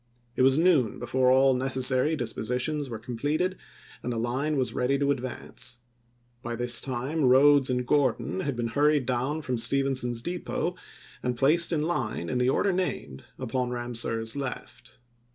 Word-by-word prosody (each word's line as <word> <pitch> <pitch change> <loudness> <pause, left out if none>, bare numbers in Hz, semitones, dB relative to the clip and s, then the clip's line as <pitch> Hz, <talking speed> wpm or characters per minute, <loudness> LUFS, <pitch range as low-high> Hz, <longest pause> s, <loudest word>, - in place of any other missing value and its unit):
It - - 0
was 135 +1 +5
noon 160 - +3
before 130 0 +1
all 135 +1 +5
necessary 130 +3 +2
dispositions 125 +3 -2
were 115 - -5
completed 145 - -2 0.5
and 125 - -3
the 120 - -3
line 130 +6 -1
was 130 -2 -1
ready 130 +2 +1
to 140 0 +1
advance. 130 -2 -4 0.6
By 120 -1 -4
this 120 0 +2
time 135 +4 -2
Rodes 135 +1 +5
and 125 -1 -1
Gordon 130 -9 +1
had 140 +3 -2
been 120 -1 -2
hurried 145 +2 +2
down 130 +5 -2
from 125 -3 -2
Stephenson's 130 -2 0
Depot, 175 0 -3 0.5
and 125 -1 -2
placed 155 +8 +4
in 155 -3 0
line, 120 - -2
in 125 - -1
the 125 +1 +2
order 195 +8 +2
named, 180 - -3
upon 125 +1 -2
Ramseur's 120 -2 -2
left. 130 -2 -7
130 Hz, 155 wpm, -27 LUFS, 120-145 Hz, 0.6 s, was